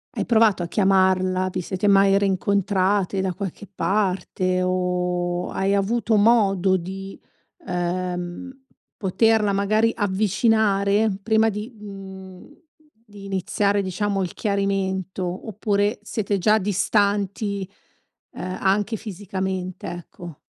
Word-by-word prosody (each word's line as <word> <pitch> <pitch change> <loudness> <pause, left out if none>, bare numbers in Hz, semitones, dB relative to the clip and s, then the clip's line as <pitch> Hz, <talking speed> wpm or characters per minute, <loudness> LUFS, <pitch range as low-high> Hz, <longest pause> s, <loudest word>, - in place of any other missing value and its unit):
Hai - - -1
provato 220 -5 +3
a - - -2
chiamarla? 185 -1 +2
Vi 185 - -2
siete 190 +3 -2
mai 195 -1 +5
rincontrate 195 0 +1
da 190 -2 -1
qualche 200 0 -6
parte 185 -2 0
o 180 -1 -1
hai 195 +1 0
avuto 220 +3 +1
modo 200 -4 +4
di, 190 +2 -7 0.5
ehm, 180 +4 -3 0.5
poterla 210 +1 +2
magari 215 +3 +2
avvicinare 205 0 +2
prima 220 +1 +3
di, 210 +3 -6
mhmm, 190 -2 -10 0.6
di 205 -3 -12
iniziare 200 +1 0
diciamo 195 +1 -1
il 180 - -3
chiarimento 190 -2 -2
oppure 205 +1 0
siete 210 -1 -2
già 210 +4 +4
distanti, 200 0 0 0.6
uhm, 185 0 -5
anche 205 +3 +1
fisicamente, 190 -3 -5
ecco? 175 -1 -9
195 Hz, 105 wpm, -23 LUFS, 185-205 Hz, 0.6 s, mai